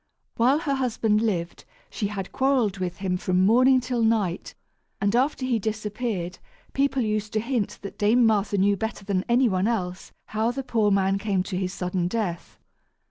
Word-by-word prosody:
While 250 +5 +3
her 290 -5 -1
husband 225 -5 +1
lived, 175 -7 -2 0.3
she 205 - -2
had 195 -2 -5
quarrelled 255 -8 +1
with 180 -1 -3
him 185 -2 -1
from 185 0 +1
morning 255 +5 +5
till 245 -1 -2
night, 215 -6 0 0.4
and 200 +3 +1
after 260 +1 +1
he 245 -3 +1
disappeared, 210 -3 -3 0.3
people 270 -2 +1
used 215 0 -2
to 215 - +1
hint 230 -2 -2
that 205 +1 -8
Dame 225 +4 +4
Martha 210 -2 +2
knew 200 +1 +3
better 215 0 -5
than 190 -2 0
any 245 +2 +4
one 190 -1 +1
else 185 -6 -3 0.2
how 220 +2 0
the 270 +3 -3
poor 225 -4 +1
man 195 0 +2
came 195 -3 0
to 190 0 -5
his 185 0 -2
sudden 180 -1 -2
death. 180 -4 -3
210 Hz, 180 wpm, -25 LUFS, 190-235 Hz, 0.4 s, morning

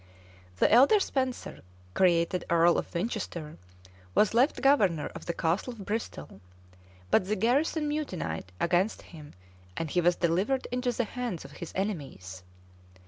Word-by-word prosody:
[] 90 0 -25
The - - +3
elder 275 - +7
Spenser, 260 -8 -2 0.3
created 175 -1 +2
earl 170 0 +4
of - - -7
Winchester, 170 -5 -4 0.6
was 215 - +4
left 255 +6 +3
governor 205 - +3
of - - -10
the 170 - -1
castle 175 +10 -1
of 205 -4 -10
Bristol; 210 - -5 0.7
but 185 - +3
the 210 - 0
garrison 285 - +1
mutinied 180 - -4
against 180 +5 +1
him, 150 -3 -13 0.4
and 165 -3 -3
he 180 - +2
was 175 +1 +3
delivered 190 +10 0
into 250 0 0
the 240 - -1
hands 235 -6 -5
of - - -11
his 170 - -8
enemies. 135 - -4
185 Hz, 145 wpm, -28 LUFS, 165-245 Hz, 0.7 s, elder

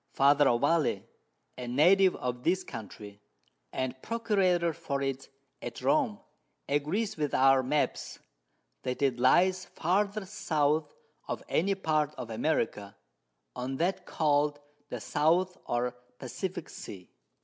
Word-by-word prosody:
Father 145 +1 +5
Ovalle, 145 +6 +2 0.6
a 125 - -5
Native 180 +9 +5
of 125 -1 -4
this 185 +2 +1
Country, 105 -2 -9 0.5
and 130 0 -3
Procurator 190 -7 +1
for 140 -2 -3
it 135 -1 -3 0.3
at 120 -1 -6
Rome, 265 -9 +2 0.5
agrees 155 +10 -1
with 150 -2 -1
our 135 0 +5
Maps, 145 +4 -1 0.6
that 125 +2 -3
it 130 -3 +1
lies 185 +9 +4
farthest 200 +3 -1
South 150 -3 0 0.3
of - - -4
any 195 +4 +1
part 155 -5 0
of 120 -3 -7
America 110 -5 -1 0.6
on 125 +2 -3
that 175 +5 -1
call'd 145 -1 +1 0.3
the - - -4
South 175 +5 +1
or 120 +1 -1 0.2
Pacifick 175 +7 -5
Sea. 95 -3 -10
150 Hz, 120 wpm, -30 LUFS, 130-185 Hz, 0.6 s, Father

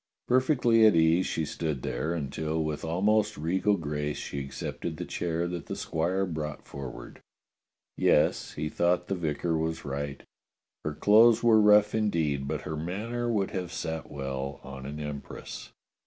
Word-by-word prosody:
Per 125 +1 +5
fectly 120 -5 +4
at 105 - +5
ease 80 +2 +4
she 80 - -1
stood 75 -4 -3
there, 80 +3 -2
until 80 +1 -2
with 75 -1 -3
almost 105 +6 +1
regal 95 +6 +1
grace 75 -2 -3
she 70 - -5
accepted 70 -1 -5
the - - -4
chair 85 0 -2
that 85 -1 -5
the - - -4
squire 90 +4 -1
brought 75 -4 -5
for 70 -2 -6
ward. - - -11 0.8
Yes, - - +2
he 75 - -3
thought 85 +3 +1
the - - +1
vicar 80 0 -1
was 80 0 -2
right. 70 0 -4 0.6
Her 75 -1 -3
clothes 115 +5 +6
were 110 -2 +6
rough 105 0 +6
indeed, 80 -11 0
but 75 0 -2
her 80 - -4
manner 110 +9 -3
would 100 -4 0
have 90 -2 -4
sat 80 -4 -4
well 70 0 -4
on 65 -1 -8
an 75 +2 -6
empress. 75 -1 -7
80 Hz, 165 wpm, -28 LUFS, 75-100 Hz, 0.8 s, clothes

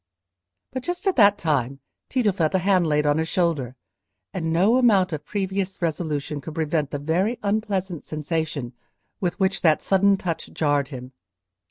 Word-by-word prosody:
But 260 - -4
just 355 +8 -4
at 385 - +2
that 205 -3 +6
time 140 -6 -1 0.3
Tito 245 -6 +2
felt 170 -2 0
a 185 -1 0
hand 185 -4 +3
laid 150 -1 +1
on 145 +1 +2
his 160 - -1
shoulder, 165 - 0 0.6
and 165 -4 -2
no 195 +9 +4
amount 195 -8 +4
of 150 - -4
previous 195 -1 -3
resolution 150 -3 -2
could 155 +3 -8
prevent 155 -2 0
the 145 - -3
very 175 - 0
unpleasant 200 -5 -2
sensation 155 -4 -3 0.5
with 180 -2 -2
which 190 0 +1
that 155 -3 +4
sudden 195 +1 +3
touch 170 -3 -4
jarred 145 -3 +1
him. 130 -2 -9
170 Hz, 165 wpm, -24 LUFS, 150-195 Hz, 0.6 s, that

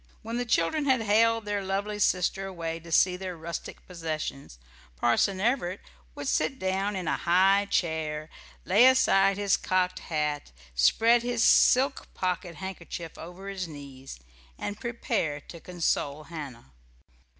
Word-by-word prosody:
When 230 +2 -4
the 245 - -1
children 235 - +1
had 260 -4 +3
haled 225 +1 +3
their 205 -1 -2
lovely 200 +2 -2
sister 195 0 +1
away 165 -3 -5
to 165 0 -13
see 180 +3 +4
their 185 -2 -6
rustic 165 0 -7
possessions, 155 - -5 0.4
Parson 155 - +1
Everett 215 -4 0 0.4
would - - -6
sit 270 - 0
down 195 0 -1
in 185 -3 -4
a - - +1
high 195 +3 +3
chair, 155 -4 -1 0.4
lay 215 +7 +6
aside 195 -7 +4
his 200 -1 +2
cocked 185 0 0
hat, 150 - -3 0.2
spread 225 - +4
his 240 -1 0
silk 265 +2 +4
pocket 180 -1 -2
handkerchief 175 -2 -7
over 180 +4 -10
his 190 -2 -4
knees, 140 - -10 0.4
and 205 0 -5
prepare 230 - -2
to 170 +4 -12
console 155 -4 -2
Hannah. 145 - -9
185 Hz, 140 wpm, -27 LUFS, 160-205 Hz, 0.4 s, lay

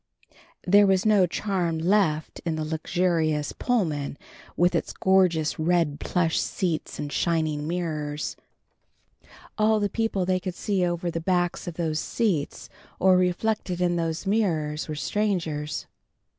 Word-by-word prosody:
There 205 +2 +6
was 190 0 +2
no 205 -4 +5
charm 175 -3 -1
left 160 -3 +1
in 165 -2 -1
the 155 0 -3
luxurious 160 -1 0
Pullman 155 - -1 0.4
with 175 +1 +3
its - - -1
gorgeous 180 -6 +2
red 160 -3 +1
plush 165 0 0
seats 170 -5 -2
and 145 -1 -5
shining 155 -3 0
mirrors. 155 -4 -3 1.2
All 215 0 +4
the 205 -1 0
people 215 -3 -1
they 185 0 +1
could 180 -1 -5
see 195 -2 0
over 175 0 -1
the 165 - -3
backs 175 0 0
of 175 - -5
those 160 -2 -1
seats 190 -11 -1 0.3
or 190 0 +5
reflected 180 +1 0
in 175 -1 +1
those 165 +1 -2
mirrors 165 -8 0
were 155 - -4
strangers. 165 -5 -2
175 Hz, 135 wpm, -25 LUFS, 155-190 Hz, 1.2 s, There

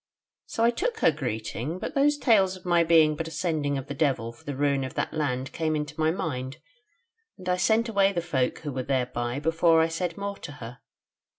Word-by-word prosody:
So 225 - -1
I 235 - +5
took 450 - -2
her - - +5
greeting; 125 +2 -4
but - - -5
those 290 +1 +3
tales 200 -9 +3
of 185 - -14
my 175 -1 +4
being 160 -2 +5
but 165 +2 -4
a - - -5
sending 155 -3 -1
of 135 - -5
the 145 - -5
Devil 135 -6 0
for 115 - -20
the 145 - -5
ruin 140 -1 +1
of 130 - -6
that - - -2
land 130 -4 -2
came 155 -1 -1
into 150 +1 -4
my 155 0 +3
mind, 135 -6 -3 0.8
and 185 - -11
I 180 0 +2
sent 220 +6 +2
away 200 -3 +3
the 180 - -1
folk 140 -7 -1
who 145 -3 -5
were 130 - -2
thereby 125 -1 -1
before 165 +1 +3
I 160 0 +3
said 165 +1 -3
more 200 0 -4
to 145 - -8
her. 120 -3 -9
155 Hz, 220 wpm, -26 LUFS, 135-180 Hz, 0.8 s, I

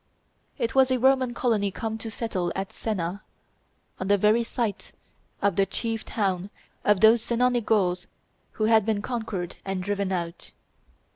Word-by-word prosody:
It 235 -4 -1
was 265 -1 +5
a 255 - +2
Roman 260 -1 +3
colony 220 -6 +1
come 220 +3 -4
to 225 - -5
settle 195 -6 -2
at 195 0 -4
Sena, 195 -3 -3 0.8
on 185 - -3
the 205 0 +4
very 215 +4 +3
site 230 -3 -3 0.5
of 200 -4 +2
the 195 0 +3
chief 225 +3 -3
town 190 -3 -1 0.3
of 205 -2 +3
those 220 +1 +7
Senonic 240 0 +1
Gauls 180 -4 +1 0.5
who 215 - -3
had 220 0 +5
been 210 -1 -1
conquered 220 -8 -4
and 190 -1 -3
driven 200 0 -1
out. 170 -2 -4
215 Hz, 155 wpm, -26 LUFS, 195-230 Hz, 0.8 s, those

